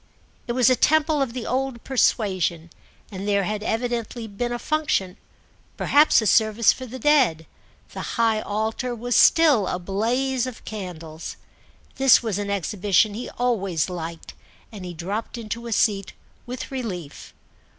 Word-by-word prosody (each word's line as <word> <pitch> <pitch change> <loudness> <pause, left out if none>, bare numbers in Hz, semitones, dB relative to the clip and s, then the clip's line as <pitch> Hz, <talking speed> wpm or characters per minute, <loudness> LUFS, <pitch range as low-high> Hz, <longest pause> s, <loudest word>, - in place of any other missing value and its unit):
It 240 - -1
was 250 -2 +3
a - - +5
temple 310 +1 +2
of 260 -4 -1
the 245 -2 -5
old 260 -2 -2
persuasion, 185 -10 0 0.4
and 195 0 -6
there 200 -1 +2
had 210 +2 -3
evidently 235 +1 -2
been 225 +3 -4
a 240 - -2
function—perhaps 285 +1 0
a - - -3
service 215 +2 +4
for 260 - -8
the 255 +3 -8
dead; 260 - +3 0.5
the - - -5 0.2
high 225 -2 +2
altar 220 +4 -2
was 245 +1 -2
still 300 - +5
a - - -1
blaze 240 +8 -1
of 255 - -9
candles. 170 -6 -7 0.6
This 265 -2 +6
was 210 -4 -2
an 205 0 -3
exhibition 200 +2 +1
he 235 +4 -6
always 195 -9 0
liked, 165 -1 -7 0.4
and 200 -4 -8
he 175 -1 -7
dropped 200 +9 -4
into 230 +1 -6
a - - -6
seat 200 -3 +1 0.3
with 250 +2 -6
relief. 185 - -6
220 Hz, 150 wpm, -23 LUFS, 195-250 Hz, 0.6 s, This